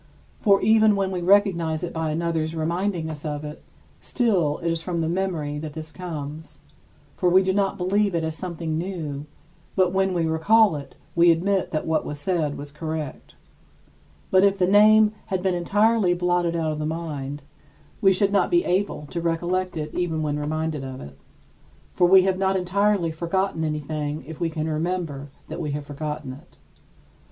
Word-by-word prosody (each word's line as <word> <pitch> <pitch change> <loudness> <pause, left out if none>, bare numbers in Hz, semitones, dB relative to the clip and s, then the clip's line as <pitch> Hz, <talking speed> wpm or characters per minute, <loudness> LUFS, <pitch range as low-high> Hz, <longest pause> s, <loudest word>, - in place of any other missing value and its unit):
For 200 -3 +4
even 220 -1 +5
when 195 -1 0
we 180 -2 -3
recognize 175 -4 +2
it 175 - -4
by 160 -1 -2
another's 160 0 -1
reminding 170 +2 -1
us 155 -2 -6
of 150 -1 -4
it, 150 0 -8 0.4
still 185 - +1
it 170 0 -2
is 165 -1 -1
from 170 -1 -2
the 160 - 0
memory 165 -5 -2
that 155 -1 -6
this 160 0 -7
comes, 160 -3 -7 0.6
for 180 - +2
we 185 +2 +5
do 190 0 +1
not 200 0 0
believe 195 +1 +1
it 165 - 0
as 160 0 -2
something 165 -3 -4
new; 155 -6 -5 0.5
but 185 -1 +2
when 190 -1 +1
we 170 -2 +1
recall 185 +5 +4
it, 140 -2 -8 0.2
we 170 +1 +6
admit 185 +4 +2
that 155 - -2
what 160 -1 +1
was 145 - -6
said 150 -2 -1
was 145 0 -8
correct. 155 -1 -6 1.0
But 185 0 +5
if 200 0 +4
the 185 - +3
name 210 +2 +6 0.2
had 185 -1 -2
been 190 -1 +1
entirely 205 +2 +2
blotted 175 -1 +1
out 160 -2 0
of 155 - -4
the 150 - -2
mind, 150 -3 -5 0.6
we 195 - +6
should 195 +1 +2
not 200 - +2
be 345 0 +2
able 185 -4 -1
to 170 - -3
recollect 175 +2 -1
it 150 -1 -4
even 165 -3 -1
when 150 -1 -1
reminded 155 -1 -2
of 130 -1 -7
it. 70 - -10 0.8
For 175 - +4
we 190 +1 +7
have 190 0 0
not 190 0 +2
entirely 190 -1 +1
forgotten 170 +1 -1
anything 150 -1 -3
if 160 +1 -9
we 170 - 0
can 160 -1 -3
remember 160 -3 -3 0.2
that - - -6
we 150 -3 -3
have 145 0 -4
forgotten 150 -1 -5
it. 135 - -16
170 Hz, 185 wpm, -24 LUFS, 155-190 Hz, 1.0 s, we